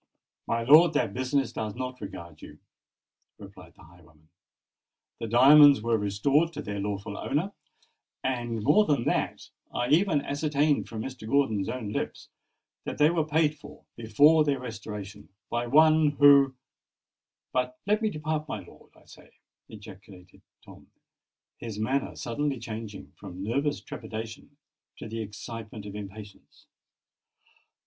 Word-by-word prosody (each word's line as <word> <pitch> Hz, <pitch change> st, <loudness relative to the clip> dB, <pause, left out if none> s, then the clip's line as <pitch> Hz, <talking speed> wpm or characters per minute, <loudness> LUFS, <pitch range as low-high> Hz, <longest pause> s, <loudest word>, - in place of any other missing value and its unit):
"My 115 Hz, 0 st, -1 dB
lord, 155 Hz, +6 st, +7 dB
that 100 Hz, -, 0 dB
business 130 Hz, +1 st, -1 dB
does 110 Hz, -2 st, -4 dB
not 125 Hz, 0 st, -6 dB
regard 85 Hz, -6 st, -9 dB
you," 75 Hz, -, -12 dB, 0.8 s
replied -, -, -14 dB
the -, -, -18 dB
highwayman. 80 Hz, -2 st, -21 dB, 0.9 s
"The 115 Hz, -, -4 dB
diamonds 140 Hz, +2 st, +7 dB
were 115 Hz, 0 st, +1 dB
restored 115 Hz, +11 st, +1 dB
to 150 Hz, -, -6 dB
their 100 Hz, 0 st, -5 dB
lawful 100 Hz, +1 st, -4 dB
owner; 155 Hz, -, -2 dB, 0.7 s
and—more 125 Hz, -, +1 dB
than 145 Hz, -8 st, +1 dB
that—I 120 Hz, +1 st, -3 dB
even 155 Hz, -1 st, +3 dB
ascertained 145 Hz, 0 st, 0 dB
from 110 Hz, -1 st, -5 dB
Mr. 125 Hz, -4 st, -8 dB
Gordon's 110 Hz, -8 st, +1 dB
own 120 Hz, -5 st, -4 dB
lips -, -, -5 dB, 0.5 s
that -, -, -5 dB
they 150 Hz, +2 st, +4 dB
were 165 Hz, -2 st, +1 dB
paid 155 Hz, -1 st, +1 dB
for, 150 Hz, +1 st, -14 dB
before 145 Hz, +8 st, +4 dB
their 140 Hz, -3 st, 0 dB
restoration, 105 Hz, -4 st, -8 dB, 0.2 s
by 120 Hz, 0 st, -1 dB
one 155 Hz, +2 st, +5 dB
who——But 130 Hz, -2 st, 0 dB
let 210 Hz, +2 st, +1 dB
me 220 Hz, -, +1 dB
depart, 155 Hz, -2 st, -3 dB
my -, -, -4 dB
lord, -, -, -18 dB
I -, -, -22 dB
say!" -, -, -17 dB, 0.4 s
ejaculated 100 Hz, -3 st, -14 dB, 0.2 s
Tom, -, -, -15 dB, 0.7 s
his 110 Hz, -3 st, -7 dB
manner 130 Hz, +6 st, -1 dB
suddenly 140 Hz, +3 st, -2 dB
changing 110 Hz, -2 st, -8 dB
from 95 Hz, -1 st, -9 dB
nervous 140 Hz, +7 st, -1 dB
trepidation 115 Hz, +5 st, -8 dB, 0.4 s
to -, -, -8 dB
the 115 Hz, +1 st, -5 dB
excitement 110 Hz, 0 st, -8 dB
of 100 Hz, -, -8 dB
impatience. 105 Hz, 0 st, -11 dB
120 Hz, 130 wpm, -27 LUFS, 105-145 Hz, 0.9 s, lord